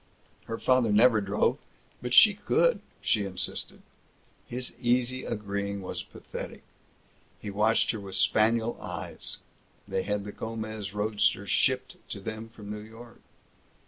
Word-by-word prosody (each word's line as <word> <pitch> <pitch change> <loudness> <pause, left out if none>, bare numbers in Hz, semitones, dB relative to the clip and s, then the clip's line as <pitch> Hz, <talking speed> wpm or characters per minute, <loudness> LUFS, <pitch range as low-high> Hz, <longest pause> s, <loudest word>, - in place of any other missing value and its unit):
Her 115 - -4
father 125 -3 +3
never 110 +1 +6
drove, 100 +1 +1 0.4
but 125 0 -4
she 210 - +9
could, - - +2 0.2
she 105 - +2
insisted. 95 -2 -3 0.6
His 125 +1 -3
easy 125 +1 +1
agreeing 100 -1 -3
was - - -4
pathetic. - - -8 0.8
He 105 - -5
watched 105 +3 +3
her 110 - -4
with 95 -2 -7
spaniel 115 +1 +3
eyes. - - -6 0.5
They 95 - 0
had 105 +1 -1
the 105 - -6
Gomez 110 -3 -5
roadster 105 0 +1
shipped - - +1
to - - -5
them 110 +1 -6
from 105 -2 -9
New 105 - -4
York. 115 +2 -12
110 Hz, 135 wpm, -29 LUFS, 105-120 Hz, 0.8 s, she